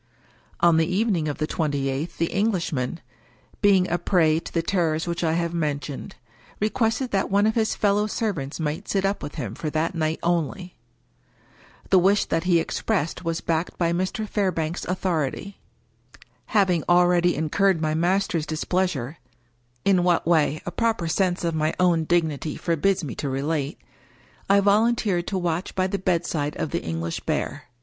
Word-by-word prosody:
On 170 -1 +5
the 160 0 +3
evening 185 -4 +1
of 145 - -3
the 155 - 0
twenty 145 -4 -1
eighth 135 +5 -3
the 165 - 0
Englishman, 175 - -1 0.6
being 195 -3 +4
a 175 - -1
prey 160 -4 +3
to - - -9
the 165 - 0
terrors 165 -3 0
which 170 0 -3
I 160 -1 +2
have 170 0 -1
mentioned, 150 -3 -3 0.4
re 215 +1 +1
quested 230 +2 0
that 195 -1 0
one 200 +1 +3
of 220 - +2
his 220 -1 +1
fellow 205 0 +2
servants 180 -11 -3
might 155 -1 -3
sit 195 -1 +1
up 195 +1 0
with 145 - -7
him 110 -4 -4
for 155 - -4
that 155 +3 -1
night 160 -1 -1
only. 175 +2 -1 1.2
The 190 - +7
wish 195 +3 +3
that 165 +1 -1
he 175 -2 +4
expressed 170 0 -2
was 165 -1 -2
backed 165 +1 -2
by 170 -1 +1
Mr. 185 +5 -2
Fairbank's 175 -6 -1
authority. 180 +1 -2 0.9
Having 190 -7 +2
already 175 0 +4
in 155 0 -2
curred 195 -4 +3
my 155 -1 0
master's 175 -1 +1
displeasure 160 -4 -1 0.3
— 120 0 -41
in 190 -3 +4
what 175 -1 +2
way, 155 -2 +2
a 175 - -3
proper 225 -3 0
sense 180 +1 0
of 170 -1 0
my 155 0 0
own 170 -3 +3
dignity 160 -3 0
forbids 180 +3 +1
me 135 -6 -4
to 145 - -4
relate 140 +3 -2 0.4
— - - -30
I 200 0 +5
volun 215 +4 +3
teered 180 -7 -1
to 195 - -1
watch 175 0 -2
by 185 - +1
the 195 +1 -2
bedside 170 -5 -1
of 155 - -3
the - - -1
English 80 0 -3
Bear. - - -3
170 Hz, 175 wpm, -24 LUFS, 155-190 Hz, 1.2 s, The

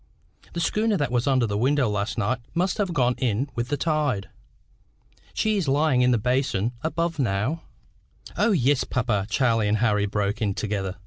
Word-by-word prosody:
The 170 - -3
schooner 210 +5 +1
that 145 -6 -1
was 125 +1 0
under 130 -3 +3
this 105 -2 -2
window 135 +1 +2
last 105 +2 -2
night 120 +3 0 0.2
must 180 +4 0
have 195 -3 0
gone 125 -6 +2
in 130 +2 -1
with 120 0 -2
the 145 - -1
tide. 150 -11 -1 1.1
She 215 -1 +1
is 180 -6 -1
lying 140 -1 +2
in 125 - +4
the 120 - +3
basin 125 -2 0
above 165 +1 -2
now." 125 +7 0 0.7
"O, 230 - +2
yes, 140 - +2
papa," 110 -5 -1
Charlie 115 -2 +2
and 105 +1 +2
Harry 105 -2 +1
broke 100 +1 -2
in 100 -3 0
together. 100 -3 -3
125 Hz, 180 wpm, -24 LUFS, 105-150 Hz, 1.1 s, in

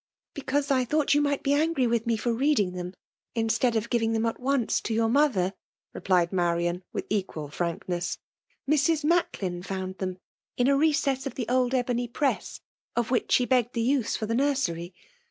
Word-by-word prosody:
" - - -71
Because 285 -1 -1
I 260 -2 +3
thought 295 +4 +1
you 290 - +4
niight 285 -1 0
be 280 - +2
angry 300 -3 +2
with 235 0 0
me 230 -1 +2
for 235 +2 -1
reading 235 -6 +2
them, 180 0 -6 0.4
instead 230 +1 +1
of 225 +1 -1
giving 225 -2 +1
them 225 0 +1
at 225 - -2
once 260 -2 +1
to 225 - -2
your 225 0 +2
mother,*' 230 -9 +2 0.4
replied 180 -2 +1
Marian, 175 0 0
with - - -4
equal 185 -8 -2
frankness. 175 +1 -3 0.2
" - - -44
Mrs. 305 +2 +2
Macklin 205 - 0
found 190 0 -5
them 185 -1 -3 0.4
in 245 - +3
a 280 - +4
recess 280 -3 +1
of 255 - -7
the 240 -4 -3
old 255 +1 +2
ebony 245 -1 0
press, 275 +4 -2 0.3
of 240 0 0
which 250 - 0
she 250 - +4
begged 245 -2 +2
the 230 - +1
use' 255 -2 +1
for 220 - -2
the 225 - -2
nursery. 230 -11 0
235 Hz, 190 wpm, -27 LUFS, 190-275 Hz, 0.4 s, you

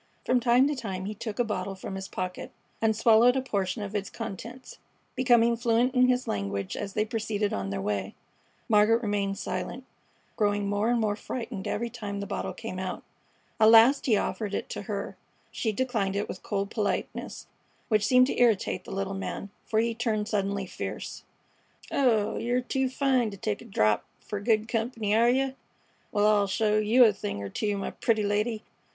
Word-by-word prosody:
From 250 - +3
time 245 +3 +4
to 295 - -1
time 195 -7 -4
he 210 - -3
took 215 0 -6
a 245 - +3
bottle 195 -3 -3
from 190 - -7
his 190 0 -5
pocket 185 0 -5 0.3
and 220 -1 +2
swallowed 230 +3 +5
a 265 - +1
portion 200 -4 -2
of 200 0 -6
its 200 -1 -2
contents, 235 +6 -8 0.4
becoming 235 -2 +4
fluent 235 +2 +2
in 255 -1 +5
his 250 0 +1
language 100 -1 -3
as 200 -1 -5
they 215 0 +1
proceeded 220 -2 -2
on 100 0 -2
their 100 0 -3
way. 100 -1 -2 0.5
Margaret 225 +2 +4
remained 200 -2 -1
silent, 190 +9 -4 0.5
growing 205 -2 +1
more 205 +3 +1
and 240 -1 +2
more 210 -2 +1
frightened 225 -4 -5
every 235 +2 -2
time 205 -4 -5
the 200 - -3
bottle - - -3
came 220 -5 -6
out. 185 -1 -4 0.6
At 220 - +7
last 230 +6 +6
he 220 -4 +4
offered 205 -1 -2
it - - -4
to - - -5
her. - - -5 0.3
She 220 - -1
declined 220 -4 -1
it 205 - -1
with 185 - -7
cold 200 0 -2
politeness, 210 -3 -3 0.4
which 215 -2 +2
seemed 255 +3 +5
to 255 - -1
irritate 205 -5 +2
the - - -9
little 195 0 -2
man, 195 0 -5 0.2
for 220 - -1
he 230 +1 +1
turned 220 -2 -1
suddenly 200 -2 -1
fierce. - - -6 0.7
"Oh, 230 -6 +2
yer 245 +2 0
too 265 +1 -1
fine 260 -3 +1
to 200 - -9
take 205 +1 -3
a - - -11
drap 105 - +2 0.2
fer 210 - -5
good 215 +1 +1
comp'ny, 225 -2 -1
are 235 +2 +5
yeh? 265 +2 +2 0.6
Wal, 205 0 +2
I'll 210 -1 +4
show 210 +2 +2
yeh 225 +4 +5
a 215 - +4
thing 100 - -5
er 100 - -5
two, 205 - -1
my 195 - -3
pretty 220 -2 0
lady. 210 +2 0
215 Hz, 190 wpm, -28 LUFS, 200-235 Hz, 0.7 s, At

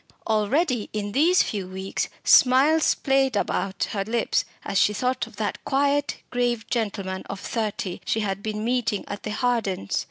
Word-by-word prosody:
Already, 235 - +1
in 205 -1 -3
these 330 - +4
few 200 -4 -4
weeks 190 +1 -3
Smiles 275 +5 +5
played 270 -3 +1
about 195 -1 -1
her 200 -2 -1
lips 225 +3 0 0.2
as 195 - +1
she 210 - +4
thought 255 +2 -1
of 230 - -15
that 210 0 -3
quiet 285 +1 0
grave 240 -2 0
gentleman 200 -5 -2
of 200 - -5
thirty 210 -5 -3
she 220 - 0
had 195 -1 -2
been 215 0 -3
meeting 235 -4 0
at 205 0 -6
the - - -5
Hardens'. 215 - -1
220 Hz, 160 wpm, -24 LUFS, 200-255 Hz, 0.2 s, Smiles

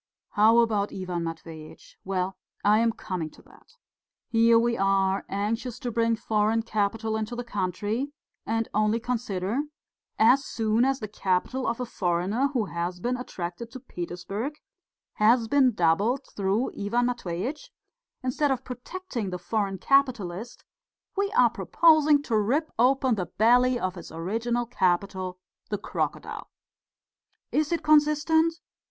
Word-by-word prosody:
"How 220 +2 +5
about 215 -4 +2
Ivan 180 -3 -4
Matveitch? 160 -1 -9
Why, 190 -1 -1 0.3
I 210 +1 +5
am 230 0 +3
coming 180 -7 -4
to - - -19
that. 480 - -21 0.5
Here 230 0 +5
we 235 0 +2
are, 195 -1 +2
anxious 220 +4 -2
to 245 -4 -4
bring 230 0 +2
foreign 220 0 +1
capital 220 0 -1
into 220 +2 -3
the 245 - -4
country 210 +5 -2 0.3
and 225 0 -1
only 215 +2 +2
consider: 225 -1 -2 0.6
as 255 +5 +5
soon 225 0 +1
as 270 0 +1
the 215 - -3
capital 200 +6 -1
of 230 +1 -1
a 250 - -2
foreigner, 195 +5 0
who 240 -6 0
has 175 0 -4
been 245 +7 -1
attracted 225 -3 -6
to 260 - -7
Petersburg, 200 - -5 0.6
has 225 +2 +4
been 270 0 +4
doubled 205 +7 +1
through 200 +5 0
Ivan 235 +5 0
Matveitch, 245 - -3 0.5
instead 260 +3 +1
of 260 -2 -1
protecting 250 - -5
the 180 - -4
foreign 195 +1 -2
capitalist, 240 -4 0 0.5
we 400 0 0
are 475 - +5
proposing 310 -3 +4
to 235 - -1
rip 255 +10 +1
open 260 +1 +3
the 185 -5 -2
belly 245 +3 +3
of 185 -4 -2
his 175 -3 -10
original 225 +9 -2
capital 185 -3 -1 0.3
the 205 - -1
crocodile. 200 - -4 1.0
Is 305 +1 +1
it 340 - -1
consistent? 305 +2 +4
225 Hz, 140 wpm, -26 LUFS, 195-250 Hz, 1.0 s, How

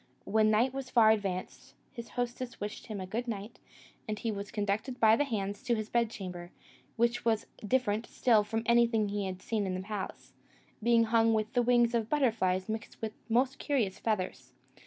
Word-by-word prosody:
When 215 +1 +3
night 235 +5 +3
was 270 -1 -5
far 225 -3 +6
advanced, 195 -4 -3 0.2
his 235 -2 -8
hostess 245 0 -3
wished 205 +4 -6
him 215 -3 -5
a 185 - -4
good 230 +6 -3
night, 215 0 -5 0.5
and 215 -1 -2
he 225 +1 -2
was 200 0 -5
conducted 210 +5 -2
by 220 -1 +6
the 290 - +1
hands 205 -5 -3
to 245 -3 +1
his 215 -1 -4
bedchamber, 190 -7 -2 0.5
which 235 +1 +1
was 225 -2 +1 0.2
different 225 -1 0
still 225 -4 +3
from 225 +2 -2
anything 235 -3 +3
he 200 -1 -2
had 185 0 -6
seen 215 -3 -1
in 185 - -2
the 185 - -3
palace, 205 0 -6 0.5
being 230 +1 +4
hung 225 0 +3
with 215 +2 -1
the 245 - +3
wings 240 -1 +3
of 230 -2 0
butterflies 215 -10 +1
mixed 220 +1 -5
with 220 -1 -4
the 225 - -3
most 260 +2 +2
curious 225 -10 0
feathers. 210 -5 -2
220 Hz, 190 wpm, -31 LUFS, 205-235 Hz, 0.5 s, far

